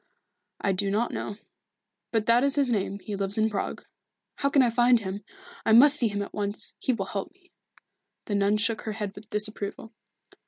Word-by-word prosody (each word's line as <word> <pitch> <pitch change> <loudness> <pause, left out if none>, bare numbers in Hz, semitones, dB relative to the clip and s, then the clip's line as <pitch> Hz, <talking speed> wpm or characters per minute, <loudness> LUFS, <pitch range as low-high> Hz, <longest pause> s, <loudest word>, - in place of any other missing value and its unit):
"I 200 - 0
do 195 +1 0
not 215 +4 0
know. 205 - -5 0.7
But 225 -2 0
that 235 +2 +4
is 280 0 +2
his 275 -4 +1
name. 200 -2 -1
He 205 0 -6
lives 195 +1 -2
in 220 0 +2
Prague." 200 - -4 0.5
"How 280 - +1
can 275 -1 +4
I 240 - +2
find 240 +1 +4
him? 200 0 -6 0.4
I 220 - +3
must 275 +5 +8
see 245 -5 +5
him 205 -1 -2
at - - -10
once 205 0 -3
he - - 0
will 215 -6 -2
help 195 -1 -5
me." 365 0 -30 0.7
The 210 - -4
nun 200 +1 +2
shook 220 +1 0
her 215 - -4
head 210 -2 -4
with 205 +1 -13
disapproval. 210 +1 -3
215 Hz, 200 wpm, -27 LUFS, 200-240 Hz, 0.7 s, must